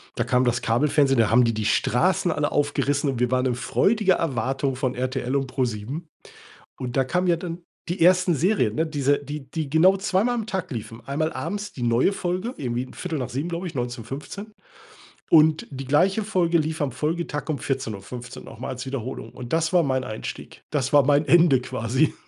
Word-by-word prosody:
Da - - 0
kam 125 0 +2
das 120 0 +1
Kabelfernsehen. 135 +2 +2
Da 110 - +4
haben 125 +3 +5
die 115 - +1
die 110 -1 -3
Straßen 155 - +2
alle 145 0 -1
aufgerissen 145 0 +1
und 130 -3 -2
wir 125 0 +1
waren 130 0 +2
in 125 - +1
freudiger 200 - +2
Erwartung 135 -2 -1
von 130 -1 -2
RTL 130 +1 -2
und 135 -2 -1
Pro7. 125 +4 -2 0.8
Und 125 -1 -5
da 135 - +3
kamen 180 +7 0
ja 175 -1 +3
dann 170 0 -6 0.3
die 175 0 -2
ersten 180 0 +5
Serien, 150 - +1
ne? 160 - +1
Diese, 145 -2 +1
die 145 -1 -8
die 155 0 -3
genau 175 +7 +4
zweimal 200 +5 +1
am 225 -3 -3
Tag 190 -4 -3
liefen. 115 -1 -7
Einmal 155 +3 -1
abends 205 +10 -4
die 125 - -7
neue 120 +9 +3
Folge 185 +6 -3
irgendwie 125 -1 -3
19:15 145 -2 -4
glaube 170 +2 -4
ich, 170 - -6
19 120 -2 -4
15. 195 - -8 0.8
Und 155 -1 +5
die 135 -1 -7
gleiche 190 - +2
Folge 180 -5 +2
lief 155 0 -2
am 140 - 0
Folgetag 150 +3 -3
um 155 -4 -2
14:15 120 -2 -5
noch - - -11
mal 125 - -5
als 130 0 -5
Wiederholung. 130 -2 -5
Und 125 +1 -8
das 165 0 +1
war 180 -2 +4
mein 130 -2 0
Einstieg. 110 -2 -7
Das 140 -3 -1
war 145 -1 +7
mein 145 +2 +3
Ende 165 -6 +5
quasi. 125 +5 0
140 Hz, 195 wpm, -24 LUFS, 125-170 Hz, 0.8 s, war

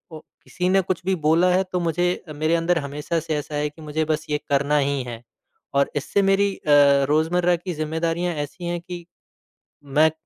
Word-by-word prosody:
ओ - - -8 0.2
किसी 180 - -3
ने 195 +1 +4
कुछ 185 -1 -3
भी 190 - +2
बोला 165 +3 +4
है 185 +1 +3
तो 180 - +1
मुझे 175 +1 0
मेरे 155 +3 +1
अंदर 170 +1 +1
हमेशा 145 +3 -3
से 160 -1 -3
ऐसा 150 0 -5
है 150 0 0
कि 150 +2 -17
मुझे 155 +1 -2
बस 155 0 -1
ये 150 - +1
करना 145 +1 +2
ही 140 -1 +1
है। 120 -2 -7 0.5
और 140 0 +2
इससे 145 +7 0
मेरी 195 +1 +3
अ, 150 - -3 0.4
रोज़मर्रा 170 +4 +2
की 175 +1 -5
ज़िम्मेदारियाँ 165 +3 -1
ऐसी 150 +4 -5
हैं 175 0 -2
कि 175 0 -8 0.8
मैं 150 +3 +3
160 Hz, 195 wpm, -23 LUFS, 150-175 Hz, 0.8 s, ने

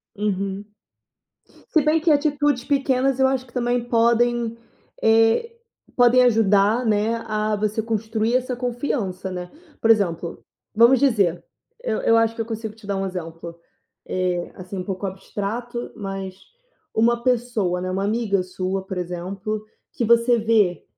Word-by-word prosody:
Uhum. 200 -1 -2 1.1
Se 315 - +5
bem 305 +2 +2
que 325 +1 +2
atitudes 290 -3 +2
pequenas, 270 -2 +1
eu 265 - +5
acho 260 -1 -1
que 235 - -21
também 245 -1 0
podem, 235 0 +2 0.4
eh, 225 - +3 0.4
podem 245 0 +6
ajudar, 220 0 +3
né, 220 +1 +1
a 215 0 0
você 215 +1 -1
construir 220 +1 -1
essa 255 -1 -2
confiança, 235 -7 -3
né. 180 -1 -6 0.3
Por 225 - +2
exemplo, 175 -6 +1 0.3
vamos 235 +4 +6
dizer: 205 -11 +2 0.4
eu - - -1
eu 230 - +4
acho 225 0 +2
que 230 - -7
eu 225 - -2
consigo 220 -1 -5
te 220 -2 -16
dar 200 - -1
um 195 0 -1
exemplo, 170 -2 -7 0.5
eh, 180 -1 -1
assim 185 +1 -7
um 180 - -4
pouco 195 +1 -4
abstrato, 215 +5 -5
mas 195 -2 -5 0.6
uma 235 +2 +2
pessoa, 230 -8 0
né, 185 - -3
uma 190 +1 -1
amiga 205 -2 0
sua, 185 +1 -3
por 190 -1 -5
exemplo, 185 +4 -4 0.3
que 240 - -2
você 235 +1 +4
vê 215 -5 +2
220 Hz, 150 wpm, -22 LUFS, 195-240 Hz, 1.1 s, podem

